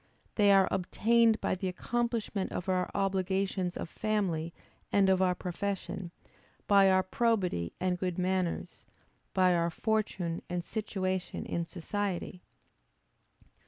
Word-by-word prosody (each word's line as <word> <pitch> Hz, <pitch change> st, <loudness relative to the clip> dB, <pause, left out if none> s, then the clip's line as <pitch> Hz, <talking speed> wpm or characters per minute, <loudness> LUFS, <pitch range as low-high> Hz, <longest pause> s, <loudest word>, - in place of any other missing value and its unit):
They 205 Hz, -2 st, +4 dB
are 195 Hz, -1 st, +6 dB
obtained 225 Hz, +4 st, +3 dB
by -, -, 0 dB
the 185 Hz, +1 st, -2 dB
accomplishment 225 Hz, +1 st, -2 dB
of 180 Hz, -, -4 dB
our 185 Hz, -1 st, +1 dB
obligations 190 Hz, -1 st, 0 dB
of -, -, -4 dB
family 180 Hz, -5 st, -1 dB, 0.4 s
and 195 Hz, -1 st, +4 dB
of 190 Hz, 0 st, +3 dB
our 180 Hz, -1 st, +3 dB
profession; 185 Hz, 0 st, -4 dB, 0.6 s
by 200 Hz, -1 st, +6 dB
our 185 Hz, 0 st, +4 dB
probity 185 Hz, -, 0 dB
and 180 Hz, -1 st, 0 dB
good 180 Hz, -2 st, -2 dB
manners; 185 Hz, -1 st, -1 dB, 0.5 s
by 185 Hz, -1 st, +5 dB
our 170 Hz, 0 st, +2 dB
fortune 190 Hz, -3 st, -1 dB
and 175 Hz, -1 st, -2 dB
situation 190 Hz, -3 st, -3 dB
in 170 Hz, -, -2 dB
society. 185 Hz, 0 st, -3 dB
190 Hz, 125 wpm, -31 LUFS, 180-205 Hz, 0.6 s, are